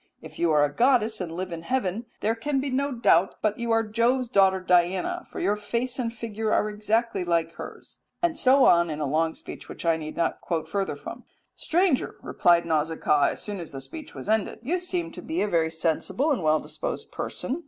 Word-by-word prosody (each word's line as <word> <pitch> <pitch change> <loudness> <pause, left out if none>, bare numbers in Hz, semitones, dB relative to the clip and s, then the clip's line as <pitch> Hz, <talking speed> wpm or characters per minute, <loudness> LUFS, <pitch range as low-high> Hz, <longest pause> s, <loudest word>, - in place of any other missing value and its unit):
If 155 -1 -12
you 170 -1 +2
are 150 -1 +5
a 145 - -4
goddess 235 -4 +2
and 175 -3 -4
live 180 +2 -4
in 165 -1 -5
heaven, 225 +2 -2
there 220 +2 +2
can 270 +5 -1
be 270 0 -2
no 280 +2 0
doubt 195 -7 +3
but 215 0 0
you 235 0 -3
are 225 0 +3
Jove's 235 +3 +1
daughter 190 -4 +4
Diana, 180 0 +1
for - - -6
your 200 +3 +1
face 235 +5 -3
and 235 -2 -1
figure 220 -1 -3
are - - +2
exactly 215 -1 0
like 165 -1 0
hers," - - -10 0.2
and 345 -2 +1
so 270 -2 +5
on 170 0 +5
in 150 -1 -4
a 150 - -1
long 160 +3 0
speech - - -10
which - - -8
I 165 -1 +3
need 155 -1 -7
not 170 - 0 0.3
further 195 +3 -2
quote - - -15
from. - - -8 0.3
"Stranger," 350 -5 +1
replied 170 -1 +3
Nausicaa, 155 -2 +2
as - - -7
soon 205 -2 -4
as 170 - -7
the 135 - -7
speech 310 - -9
was - - -8
ended, 220 -1 0
"you 340 +9 0
seem 360 -1 -2
to - - -9
be 320 +2 -1
a - - 0
very 165 -4 +1
sensible 165 - 0
well 155 -1 +3
disposed - - -5
person. 270 +6 -3
210 Hz, 215 wpm, -26 LUFS, 170-250 Hz, 0.3 s, are